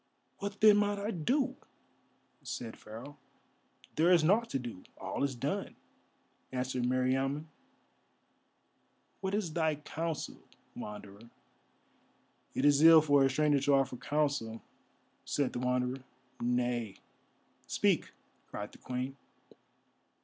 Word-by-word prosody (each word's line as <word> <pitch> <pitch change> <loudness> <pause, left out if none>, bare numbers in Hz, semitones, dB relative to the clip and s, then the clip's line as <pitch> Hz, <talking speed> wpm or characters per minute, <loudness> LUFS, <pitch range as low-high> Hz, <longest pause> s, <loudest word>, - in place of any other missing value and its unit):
"What 200 0 -5
then 210 -1 +8
might 205 0 +1
I 205 +2 -2
do?" 250 - 0 0.8
said 115 -2 -6
Pharaoh. 115 +7 -10 0.8
"There 165 +3 +5
is 170 -3 +6
nought 215 +8 +3
to - - -1
do: 120 -7 -7 0.2
all - - -3
is 140 -2 0
done," 120 - -3 0.8
answered 130 -1 -1
Meriamun. 135 +3 +1 1.7
"What 190 0 -1
is 190 -7 -2
thy 160 -2 +1
counsel, 160 +2 -4 0.3
Wanderer?" 105 +1 -9 1.3
"It 135 - +1
is 145 0 +5
ill 160 0 +9
for 145 -2 +4
a 135 - +4
stranger 145 +1 +3
to 140 +1 +2
offer 135 -2 +1
counsel," 140 -5 -1 0.6
said 145 -3 -1
the - - -3
Wanderer. 125 +1 -1 0.4
"Nay, 120 -3 0 0.7
speak," - - +1 0.4
cried 105 0 -6
the - - -16
Queen. 130 +2 -4
140 Hz, 115 wpm, -32 LUFS, 125-160 Hz, 1.7 s, ill